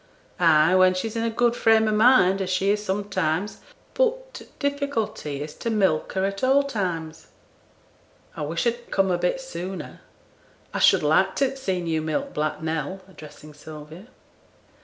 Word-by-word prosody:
'Ay! 160 -1 +5
when 185 0 +5
she's 220 +4 -4
in 230 - -1
a 230 - 0
good 240 +1 +1
frame 220 -1 +3
o' - - +1
mind, 210 -4 +4
as 190 - -3
she 190 +2 +1
is 210 0 -1
sometimes. 195 -2 -2 0.3
But - - 0
t' - - -10
difficulty 280 - -3
is 150 0 -8
to 230 - -3
milk 190 -8 +1
her 190 0 0
at 195 +2 -4
all 270 +2 +4
times.' 175 - -4 1.1
'I - - -6
wish 160 +6 -2
I'd 240 0 -2
come 195 -1 +1
a 175 - 0
bit 180 +8 0
sooner. 185 - -7 0.7
I - - -2
should - - +5
like 160 +6 +2
t' 275 - +2
have 270 0 -4
seen 185 -8 -2
you 160 -1 -1
milk 275 - -3
Black 155 +1 -2
Nell,' 160 +4 -3
addressing 150 -3 -13
Sylvia. 155 +6 -11
190 Hz, 170 wpm, -24 LUFS, 160-230 Hz, 1.1 s, Ay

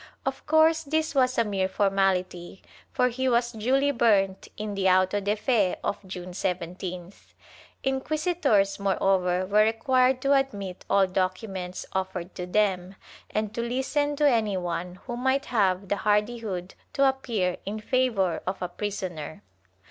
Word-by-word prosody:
Of - - -3
course 315 +1 +4
this 315 +1 -1
was 255 -2 +2
a 230 - +4
mere 195 -3 -1
formality 190 -2 0 0.3
for 250 -1 +2
he 260 +2 -1
was 240 0 +2
duly 265 +6 +1
burnt 200 -6 +2
in 210 -1 -4
the 195 -1 +2
auto 185 +2 +3
de 205 +1 0
fe 215 -4 +1
of - - -2
June 180 -1 -7
17th.' 180 0 -5 0.5
Inquisitors, 270 - +1
moreover, 190 -2 +1
were 210 +3 +4
required 255 +3 +2
to 275 +1 +3
admit 200 -9 -1
all 195 -1 +4
documents 185 0 -3
offered 190 -1 -3
to 180 -1 -6
them, 190 -1 0 0.3
and 215 0 -2
to 235 - -2
listen 265 +5 -1
to 295 0 +3
any 220 -7 +2
one 180 0 -3
who 240 - -4
might 265 +3 0
have 195 -4 +1
the 205 - 0
hardihood 210 -3 -1 0.2
to 275 -1 +4
appear 230 -9 -1
in 210 +3 -4
favor 220 -6 +1
of 185 - -2
a 180 - -2
prisoner. 180 -6 -5
205 Hz, 150 wpm, -26 LUFS, 185-255 Hz, 0.5 s, course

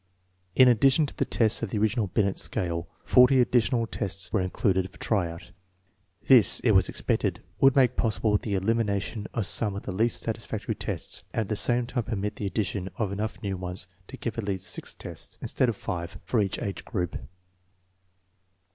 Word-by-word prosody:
In 130 - +7
addition 135 +6 +4
to - - -7
the - - 0
tests 115 -1 +2
of 115 - -2
the 105 - -2
original 110 +1 +1
Binet 100 +1 +1
scale, 85 -1 -2 0.2
40 125 +1 +6
additional 120 -1 +2
tests 95 -4 -4
were 110 - +2
included 95 0 0
for - - -18
try 95 -6 0
out. 85 +1 -10 0.7
This, 120 -8 +6
it 115 - +3
was 95 -3 +4
expected, - - -1 0.2
would 135 -1 +5
make 130 -4 +4
possible 110 -1 +1
the 105 -3 -2
elimination 105 0 -1
of 115 - 0
some 105 0 -1
of 100 - -5
the - - -4
least 110 +5 0
satisfactory - - -3
tests, - - -4
and - - +2
at 105 - -4
the 105 - 0
same 120 +3 +2
time 120 0 -2
permit 105 -1 -3
the 100 - -2
addition 100 -2 -2
of 105 -4 -1
enough 105 +2 -3
new 100 -2 -2
ones 90 0 -4 0.2
to 130 - -9
give 115 -3 -4
at - - -2
least 95 -2 -3
six - - -3
tests, - - -6
instead 130 - 0
of 115 - -2
five, 85 -2 -5
for 110 +5 +1
each 100 -1 -1
age 100 - -4
group. 90 -7 -3
105 Hz, 190 wpm, -27 LUFS, 95-115 Hz, 0.7 s, In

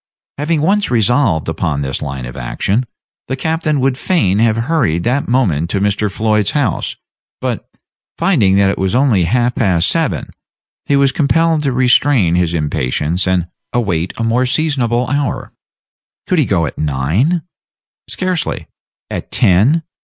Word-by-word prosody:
Having 150 +1 0
once 200 +3 +2
resolved 115 - +2
upon 80 -2 -2
this 65 -2 -3
line 65 -3 -5
of - - -8
action, 95 - -1 0.4
the 130 - -2
captain 160 +1 -1
would 130 0 0
fain 105 - +1
have 115 -1 +2
hurried 115 - 0
that 130 +4 0
moment 90 - +1
to 100 - 0
Mr. 105 +1 0
Floyd's 105 0 +1
house; 145 - -1 0.4
but, - - -4 0.5
finding 110 - +3
that 100 0 +3
it - - -5
was 95 +3 0
only 125 -9 +3
half 120 +6 +1
past 95 -8 +1
seven, 165 -4 -1 0.5
he 140 - +1
was 140 -1 +3
compelled 160 +2 +2
to 140 -2 0
restrain 125 - +3
his 85 -1 +1
impatience 75 +3 -1
and 90 -2 +1 0.3
await 95 -8 -1
a 115 - -2
more 120 +3 +1
seasonable 125 -5 0
hour. 145 0 -2 0.7
Could 180 - +1
he 150 - +3
go 85 -7 +1
at - - -6
nine? 80 - 0 0.7
Scarcely. 185 -3 -2 0.5
At - - -5
ten? 115 - +3
115 Hz, 150 wpm, -16 LUFS, 90-145 Hz, 0.7 s, finding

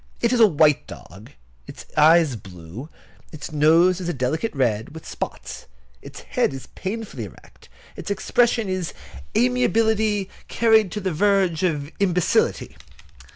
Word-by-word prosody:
It 235 +1 +1
is 245 - +1
a 225 - +8
white 150 -4 +2
dog. 95 +5 -12 0.4
Its - - -11
eyes 155 -2 +5
blue. 95 - -10 0.4
Its 155 +1 -8
nose 165 +5 +3
is 175 - -3
a 175 - -2
delicate 135 - -2
red, 120 +1 -1
with 160 - -10
spots. - - -7 0.3
Its - - -11
head - - -1
is 135 - -8
painfully 190 - -5
erect, 95 - -17 0.3
its - - -8
expression 230 +2 +1
is 185 -3 -3 0.4
amiability 205 - +1 0.2
carried 220 -4 +3
to 210 - -4
verge 190 -1 +1
of 150 -5 -1
imbecility. 180 -3 0
170 Hz, 135 wpm, -22 LUFS, 135-200 Hz, 0.4 s, a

